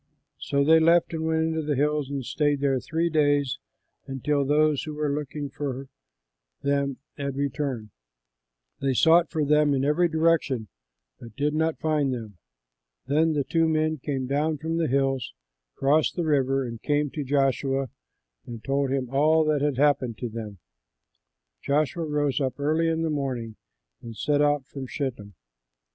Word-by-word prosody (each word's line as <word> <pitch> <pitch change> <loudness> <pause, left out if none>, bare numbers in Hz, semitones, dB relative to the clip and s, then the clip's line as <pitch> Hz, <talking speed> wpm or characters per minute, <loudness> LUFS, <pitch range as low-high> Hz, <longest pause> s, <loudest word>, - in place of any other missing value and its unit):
So 140 0 0
they 160 +3 +6
left 170 +1 +3
and 160 0 -2
went 160 0 +1
into 160 0 -1
the 150 -1 -1
hills 150 0 0
and 140 -3 -4
stayed 145 0 0
there 135 -2 +1
three 165 +6 -1
days 145 -4 +1 0.5
until 140 +2 0
those 150 +1 +2
who 155 -1 -6
were 150 -1 -1
looking 145 0 -4
for 135 -2 -5 0.7
them 140 -1 0 0.2
had 140 -2 -3
returned. 135 -5 -3 0.9
They 135 -1 0
sought 165 +4 +5
for 155 -3 -1
them 150 0 +3
in 135 0 0
every 160 +5 +3
direction 160 - +1 0.5
but 115 -2 -12
did 150 +1 0
not 160 +1 0
find 150 -3 0
them. 110 -7 -6 0.7
Then 155 +3 +2
the 145 -2 0
two 165 +2 +1
men 155 0 +1
came 135 -1 -3
down 150 +4 0
from 160 +3 -3
the 165 -1 +1
hills, 135 -1 0 0.4
crossed 145 +3 +2
the 175 - -1
river, 135 -3 +1
and 115 -2 -7
came 145 -1 0
to 150 - -4
Joshua 135 -1 0 0.6
and 115 -2 -8
told 140 0 0
him 130 -1 -1
all 155 +5 +3
that 150 -2 +1
had 145 -3 0
happened 140 -5 +2
to 120 - -4
them. 110 -3 -7 1.0
Joshua 155 +3 0
rose 145 -2 0
up 130 +1 -2
early 155 +3 +1
in 165 0 0
the 160 - 0
morning 125 -6 -3 0.5
and 115 -2 -9
set 145 -1 +1
out 145 -2 +2
from 135 -1 -7
Shittim. 120 -8 -5
145 Hz, 165 wpm, -26 LUFS, 135-155 Hz, 1.0 s, they